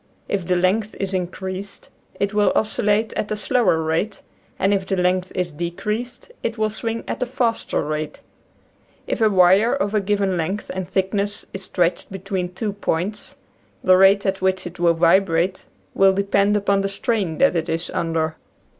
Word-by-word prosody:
If 190 -4 -2
the 180 - +2
length 195 +4 +1
is 195 0 -2
increased 185 +2 -5 0.3
it 200 +1 0
will 210 -1 +3
oscillate 215 0 +1
at 210 - -3
a 215 - -1
slower 205 -4 +2
rate, 165 +6 -2 0.3
and 195 +2 +2
if 195 -1 -1
the 195 - 0
length 180 0 +1
is 180 -2 -1
decreased 210 - -4
it 230 0 -3
will 215 0 0
swing 225 +1 -3
at - - -4
a 250 - 0
faster 240 -7 -1
rate. 150 0 -4 0.9
If - - -3
a 220 - +5
wire 190 +5 +5
of 220 -7 -1
a 210 - +2
given 195 -2 0
length 190 +6 -3
and 185 -1 -4
thickness 200 +2 -1
is 195 - -5
stretched 175 +1 0
between 190 -2 -4
two 205 +1 -2
points 205 +1 -3 0.5
the 185 -1 +6
rate 195 +2 +5
at 195 -1 -1
which 190 0 +1
it 175 +1 -8
will 170 -1 +3
vibrate 180 +1 +2 0.3
will 195 0 +5
depend 200 +1 +2
upon 200 -1 +1
the 195 - -1
strain 195 -5 -1
that 275 -8 +3
it 165 0 -1
is 165 +1 -2
under. 160 -1 -1
195 Hz, 175 wpm, -22 LUFS, 180-210 Hz, 0.9 s, the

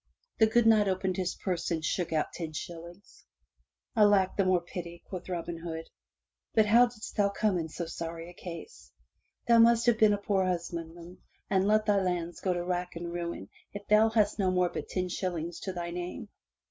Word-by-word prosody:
*' - - -46
The 220 - +6
good 235 +1 +3
Knight 215 -2 +5
opened 185 0 0
his 185 -1 -1
purse 180 -4 -2
and 160 -2 -1
shook 175 0 -1
out 155 -1 0
ten 160 -3 -5
shillings. 170 +4 -9 0.7
"Alack! 205 -3 +4
the 200 - +2
more 185 -1 +3
pity,*' 170 -1 -8
quoth 185 -1 -7
Robin 170 -1 -4
Hood. 165 -1 -6 0.6
"But 220 - +5
how 235 +4 +6
didst 235 -3 -9
thou 205 -2 +3
come 200 -2 0
in 160 -1 -4
so 170 +2 -5
sorry 165 0 -6
a 175 - -11
case? 175 - -10 0.6
Thou 235 -1 +6
must 230 0 +5
have 240 -2 +3
been 215 -1 +6
a - - +1
poor 200 -1 0
husbandman 170 -1 -4 0.3
and 190 0 +3
let 215 0 +3
thy 205 -2 +3
lands 175 -2 -2
go 185 - 0
to 175 -1 -1
rack 180 0 -2
and 170 0 -5
ruin 170 - -5 0.3
if 205 0 -7
thou 215 +1 +6
hast 215 -1 +1
no 190 -2 +2
more 180 -1 +2
but - - -6
ten 185 -1 -1
shillings 175 -2 -3
to 190 - -4
thy 175 -1 -5
name. 180 +4 -6
180 Hz, 200 wpm, -29 LUFS, 170-205 Hz, 0.7 s, The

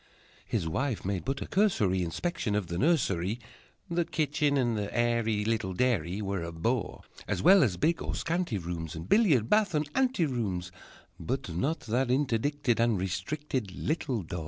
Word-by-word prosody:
His 80 - -1
wife 130 - -2
made 95 -2 -2
but 135 +2 -2
a - - -7
cursory 105 - +2
Inspection 110 - -2
of 105 -2 0
the 85 0 -4
nursery; 115 - +1 0.5
The 170 -1 +1
kitchen 150 -2 0
and 120 -3 +1
the 105 -1 -3
airy 115 -3 +1
Little 110 -4 -1
dairy 105 -5 0
Were 100 -2 -2
a 85 0 -4
bore, 95 +5 -2 0.2
As - - -1
well 190 +3 +8
as 100 - +2
big 165 +3 +1
or - - -3
scanty 170 - -1
rooms, 85 -2 -5
And 80 +2 -7
billiard, 150 - +4
bath, 210 - +3
and 150 0 +1
ante 260 -10 +2
rooms, 100 - -2 0.5
But 130 -2 -3
not 145 - -1
that 120 +3 0
interdicted 130 -1 +1
And 115 -2 +3
restricted 100 - -3
Little 135 - -1
door! 85 +1 -5
120 Hz, 170 wpm, -29 LUFS, 95-150 Hz, 0.5 s, well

